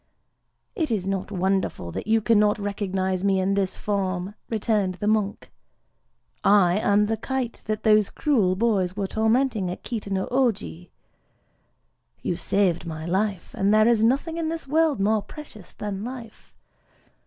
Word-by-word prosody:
"It 320 -3 -1
is 210 -5 -1
not 195 -1 -2
wonderful 190 - -1
that - - -6
you 225 0 +3
cannot 210 -1 +3
recognize 190 -2 -2
me 195 -1 +2
in 190 +1 +1
this 195 -2 -1
form," 190 -2 -2 0.2
returned 210 -4 0
the 205 - -5
monk: 210 -1 0 0.9
"I 195 -2 +4
am 205 0 +3
the 220 +1 -1
kite 255 +1 -3
that 215 0 -2
those 215 -2 +4
cruel 220 -12 +1
boys 195 -4 +1
were 200 - -1
tormenting 220 -1 +1
at 180 - -7
Kita 225 -4 -5
no 190 -1 -1
Ōji. 190 - -1 1.3
You 175 - -1
saved 180 -3 0
my 160 -1 -5
life; 195 +1 -1
and 195 +1 +1
there 215 +1 +5
is 230 -2 +3
nothing 280 +8 +1
in 325 -1 -1
this 325 -3 -5
world 310 -1 +2
more 210 +2 +2
precious 215 - -12
than 205 -1 -5
life. 240 -2 -9
205 Hz, 155 wpm, -24 LUFS, 190-225 Hz, 1.3 s, there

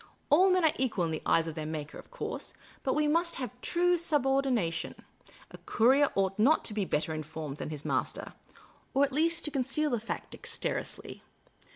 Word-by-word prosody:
All 365 +6 +6
men 365 -2 +3
are 310 - +4
equal 225 -9 +1
in 165 - -2
the 155 - -3
eyes 165 - +4
of 165 - -4
their 155 0 -5
Maker, 155 -1 -5
of - - -14
course; - - -5 0.3
but 265 - 0
we 300 0 +2
must 335 +3 +2
have 255 -2 -4
due 355 0 +2
subordina 270 - +2
tion. - - -4 0.6
A - - -11
courier 265 +5 +4
ought 195 +1 0
not 280 +9 +4
to 215 - -2
be 210 -2 0
better 160 -1 -1
informed 155 -2 -5
than - - -5
his 150 -2 -6
master - - -2 0.3
— - - -29
or 275 - +5
ought - - +7
at 280 - -6
least 330 +4 +1
to 300 - -1
conceal 275 +3 0
the 240 - +1
fact 225 - -5
dexterously. - - -4
260 Hz, 205 wpm, -30 LUFS, -, 0.6 s, ought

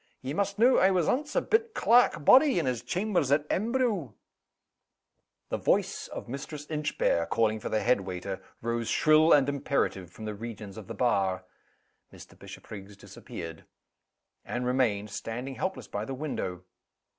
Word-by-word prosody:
Ye 135 +2 -3
must 200 +3 -1
know, 245 +4 +5
I 190 - +5
was 180 -4 +1
ance 295 +3 -1
a - - +3
bit 445 0 +1
clerk 235 -10 +4
body 265 - +7
in 170 - +1
his 125 -3 -1
chambers 185 -7 0
at 145 +1 +3
Embro 215 - 0 0.7
" - - -54
The - - -1
voice - - 0
of - - -8
Mistress 145 +3 -6
Inchbare, 150 - 0
calling 110 -1 +1
for - - -5
the 110 - 0
head 120 -4 +3
waiter, 95 0 -5 0.2
rose 115 0 -2
shrill 155 +1 +4
and 140 -2 +6
imperative 140 -10 -1
from 110 +4 -10
the 105 - -3
regions 105 -2 -8
of 110 -4 -9
the - - -6
bar. 100 -7 +1 0.7
Mr. - - -14
Bishopriggs 100 -1 -11
disappeared. 80 -4 -9 0.8
Anne 120 - -3
remained, 120 -5 0
standing 125 +6 -5
helpless 190 +7 -4
by 105 - -4
the 135 +4 -5
window. 95 - -4
130 Hz, 160 wpm, -28 LUFS, 105-175 Hz, 0.8 s, body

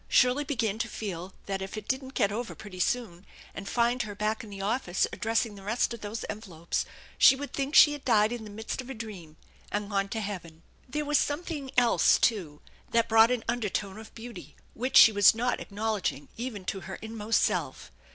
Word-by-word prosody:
Shirley 250 +3 +4
began 225 -7 -1
to 230 - -1
feel 190 -4 -6
that 195 -1 -3
if 190 +2 -6
it 215 - -7
didn't 265 0 -3
get 200 -5 +2
over 230 +3 -4
pretty 195 -4 -10
soon 195 -5 -1 0.3
and 195 0 -7
find 240 +1 +2
her 210 -3 -5
back 215 +2 -1
in 220 - -10
the 200 -1 -8
office 195 -2 0
addressing 225 0 0
the 200 - -11
rest 225 +4 0
of 235 - -8
those 210 +2 -5
envelopes 185 -6 -4 0.3
she 265 - +8
would 285 +1 -7
think 275 +1 -2
she 295 - +9
had 290 - -8
died 215 -3 +3
in 240 -2 -4
the 215 - -9
midst 220 +5 -5
of 255 - -12
a 265 - -5
dream 190 -9 -9 0.3
and 205 0 -3
gone 195 0 0
to 225 - -3
heaven. 175 -6 -6 0.3
There 300 +3 -2
was 295 0 +3
something 295 -2 -3
else 240 -1 +5
too 170 -10 0 0.3
that 230 0 +2
brought 225 +1 +7
an 250 -2 -1
undertone 210 -3 -2
of 220 - -13
beauty, 235 +1 -10 0.2
which 255 +3 +1
she 220 - +10
was 205 0 +6
not 245 +2 0
acknowledging 205 -8 -3
even 225 -5 -5
to 195 - -3
her 190 +1 -7
inmost 220 0 -1
self. - - -2
220 Hz, 205 wpm, -28 LUFS, 200-245 Hz, 0.3 s, she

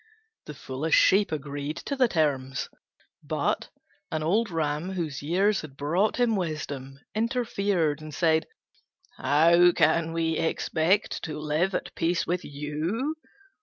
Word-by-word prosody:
The 150 - -7
foolish 140 +4 -1
Sheep 200 0 +4
agreed 145 0 -4
to 280 - -2
the 260 -2 +4
terms; 140 - -1 0.5
but - - -1 0.4
an 155 -1 -1
old 210 +8 +2
Ram, 160 +2 -2
whose 160 -7 -3
years 190 +7 +2
had 140 -3 -11
brought 170 +9 +1
him 240 -3 +2
wisdom, 145 -6 -4 0.2
interfered 205 - 0
and 155 0 -8
said, 160 +1 +2 0.7
"How 170 +6 +5
can 160 +1 +2
we 165 -1 0
expect 165 +4 +1
to 155 -2 -5
live 155 +5 0
at - - -4
peace 170 +1 0
with 180 +1 -1
you? 155 - -3
160 Hz, 130 wpm, -27 LUFS, 150-190 Hz, 0.7 s, How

